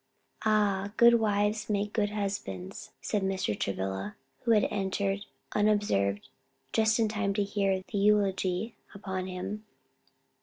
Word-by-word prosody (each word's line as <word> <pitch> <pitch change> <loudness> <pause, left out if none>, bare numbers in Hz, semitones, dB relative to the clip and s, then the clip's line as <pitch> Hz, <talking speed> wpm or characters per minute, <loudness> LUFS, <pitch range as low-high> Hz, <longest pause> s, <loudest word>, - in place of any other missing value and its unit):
"Ah, 205 -2 +2
good 235 0 +7
wives 210 0 +1
make 205 0 0
good 205 -2 +1
husbands," 195 - -4
said 210 - -1
Mr. 190 - 0
Travilla, 95 +1 -2 0.2
who - - -5
had 210 - +4
entered 195 0 -1 0.3
unobserved, 205 - +1 0.5
just 220 -1 +3
in 225 -2 +3
time 210 -2 -1
to 205 - +2
hear 195 -2 0
the - - -1
eulogy 200 0 +2 0.2
upon 190 -2 -4
him. 190 +3 -5
200 Hz, 125 wpm, -29 LUFS, 190-210 Hz, 0.5 s, good